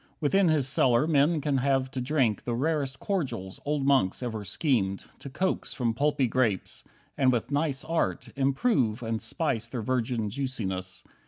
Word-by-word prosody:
Within 180 +5 +3
his 150 -5 +2
cellar 125 0 +3
men 155 +1 +3
can 140 -2 +1
have 135 0 +1
to 130 - -3
drink 125 -6 +1
The 120 - -2
rarest 140 0 -1
cordials 120 - -3
old 145 -1 0
monks 130 -6 +2
ever 110 -4 -3
schemed 100 - 0 0.2
To 140 - -8
coax 185 +8 -1
from 120 -4 0
pulpy 140 +1 +1
grapes, 115 -5 -1 0.3
and 130 -2 +3
with 120 +1 -1
nice 145 -1 0
art 165 0 -1
Improve 135 - +1
and 115 -1 -2
spice 120 -8 -2
their 120 -2 -4
virgin 115 -3 -1
juiciness. 95 -8 -3
130 Hz, 160 wpm, -28 LUFS, 115-145 Hz, 0.3 s, Within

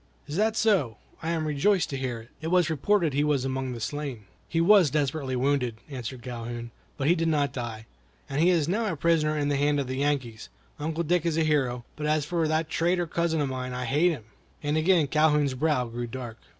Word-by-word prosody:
"Is 145 - -6
that 215 +3 +2
so? 190 - +2 0.2
I 160 - -3
am 165 -2 0
rejoiced 160 +4 +2
to - - -2
hear 125 -3 -3
it. 115 - -16
It 160 - -4
was 175 -1 +3
reported 165 +1 +2
he 145 +2 +2
was 145 -3 +1
among 130 -1 -2
the 120 - -6
slain." 130 -2 -4 0.2
"He 165 - 0
was 180 -1 +6
desperately 140 -2 -1
wounded," 125 -2 +1 0.2
answered 125 -2 -6
Calhoun, 120 -1 -6 0.3
"but 135 - -1
he 170 - +6
did 165 -1 0
not 145 -3 +1
die, 115 -4 -5 0.4
and 140 +2 -1
he 175 - +5
is 165 -5 +2
now 210 +3 0
a - - -3
prisoner 155 -1 +2
in 145 -1 0
the 145 - +1
hands 145 +1 +2
of 140 - -1
the 130 +1 -4
Yankees. 130 - -1 0.3
Uncle 160 +2 -2
Dick 175 +1 +1
is 165 -2 0
a 165 - +3
hero; 130 -6 0
but 150 0 -3
as 155 -1 +1
for 165 -1 0
that 155 +1 0
traitor 175 +2 +1
cousin 165 -1 0
of 140 - 0
mine, 130 -1 -4
I 125 0 -3
hate 150 +8 +3
him!" 150 -10 -4 0.4
and 145 +1 0
again 160 0 +4
Calhoun's 150 -2 +2
brow 130 -1 +1
grew 120 +1 -5
dark. 120 -2 -7
145 Hz, 225 wpm, -27 LUFS, 130-165 Hz, 0.4 s, was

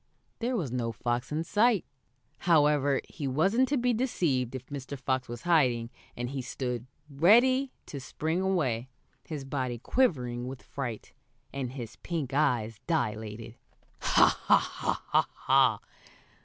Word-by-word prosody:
There 245 +2 -1
was 155 - -2
no 120 -2 -1
fox 120 +2 -2
in 155 +2 -1
sight. 210 +3 +3 0.6
However, 145 -3 +4
he 145 - -5
wasn't 195 - +2
to 290 - +2
be 245 0 +2
deceived, 155 - 0
if 130 -1 -6
Mr. 140 0 -6
Fox 130 0 -1
was 120 0 -7
hiding, 125 -9 +2 0.3
and 120 +1 -3
he 135 -1 -3
stood 125 -1 -4 0.2
ready 240 - +4
to 140 - -7
spring 160 +6 -2
away, 135 -11 0 0.4
his 150 -4 -5
body 130 -3 -2
quivering 125 - 0
with 130 0 -7
fright, 120 -6 -6 0.4
and 130 -2 -4
his 120 -5 -7
pink 155 -6 -4
eyes 115 -7 +1
dilated. 110 -6 -2 0.4
"Ha! - - +4
Ha! - - +2
Ha!" - - +3
135 Hz, 135 wpm, -29 LUFS, 120-170 Hz, 0.6 s, However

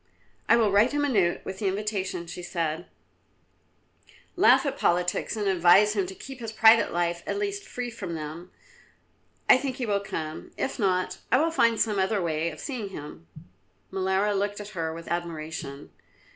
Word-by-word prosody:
"I 230 - +7
will 220 -3 +3
write 210 +7 +4
him 290 0 +1
a - - 0
note 190 -8 +2
with 190 0 -6
the 205 - -1
invitation," 190 -3 -2
she 175 +1 -8
said, 170 -1 -3 1.5
"laugh - - +5
at - - -1
politics 180 +5 0
and 205 -1 -1
advise 190 +3 +5
him 195 -3 0
to 190 - -8
keep 270 +4 -10
his 225 -2 -5
private 225 +1 +5
life 170 0 -1
at - - -1
least 405 0 -3
free 245 -1 -5
from 185 -7 -6
them. 160 +3 -7 1.0
I - - +8
think 265 -1 -3
he 255 -2 -3
will 205 -2 +1
come; 160 -5 -6
if 270 - -3
not, 185 -3 0
I 250 - +6
will 325 +4 +2
find 230 -7 +3
some 210 -3 +1
other 190 +2 +1
way 165 -2 -1
of 155 - -10
seeing 240 -8 -5
him." 145 - -10 0.6
Molara 190 +2 +1
looked 205 +1 -1
at 205 0 -7
her 165 -5 -3
with 165 +1 -9
admiration. 160 -4 -5
195 Hz, 180 wpm, -26 LUFS, 170-220 Hz, 1.5 s, I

